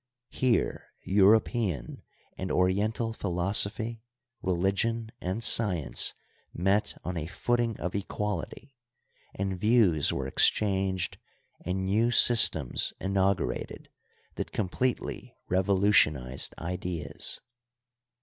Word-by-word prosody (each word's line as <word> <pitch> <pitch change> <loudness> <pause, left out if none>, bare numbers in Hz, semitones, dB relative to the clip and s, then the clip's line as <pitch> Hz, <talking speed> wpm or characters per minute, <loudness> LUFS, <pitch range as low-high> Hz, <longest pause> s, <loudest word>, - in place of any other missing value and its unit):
Here 125 -3 0
European 100 - +2 0.3
and 95 - -5
Oriental 105 +5 +1
philosophy, 100 +4 0 0.4
religion, 100 +5 0
and 95 +6 -3
science 90 - +2 0.4
met 95 +4 +1
on 90 0 -4
a 80 -1 -4
foot 120 +7 -1
ing 115 -3 -1
of 90 - -3
equality, 105 - -4 0.6
and 95 -2 -3
views 105 -10 +3
were 65 - -3
exchanged 95 +4 +1 0.4
and 95 +2 -2
new 105 +5 +2
sys 120 -2 +6
tems 70 -6 -2
inaugurated 95 -1 -1 0.5
that - - -4
completely 120 +6 -3
revolutionized 95 - +2
ideas. 90 0 -4
95 Hz, 90 wpm, -28 LUFS, 90-110 Hz, 0.6 s, sys